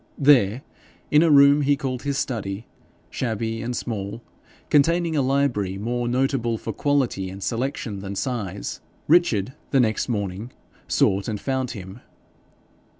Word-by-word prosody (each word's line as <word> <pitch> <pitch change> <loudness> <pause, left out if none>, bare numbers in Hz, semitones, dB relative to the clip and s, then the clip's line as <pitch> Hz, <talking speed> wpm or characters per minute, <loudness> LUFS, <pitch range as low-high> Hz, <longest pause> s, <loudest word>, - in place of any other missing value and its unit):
There, 130 -4 +4 0.5
in 150 - +6
a 165 - +4
room 140 0 +7
he 145 0 +2
called 130 -4 -3
his 140 -1 -2
study, 105 -5 -3 0.5
shabby 115 -1 -2
and 120 +1 -3
small, 105 0 -5 0.5
containing 165 +3 +3
a 145 - +3
library 130 -8 0
more 120 +4 -2
notable 125 -2 0
for 110 - -5
quality 130 -8 0
and 95 +1 -8
selection 120 -4 -3
than 100 0 -6
size, 100 -5 -4 0.3
Richard 130 - +3 0.2
the 135 - +3
next 110 0 +1
morning 100 +1 -3 0.4
sought 100 +1 +2
and 105 -2 -3
found 130 0 -2
him. 95 +3 -9
120 Hz, 140 wpm, -23 LUFS, 100-140 Hz, 0.5 s, room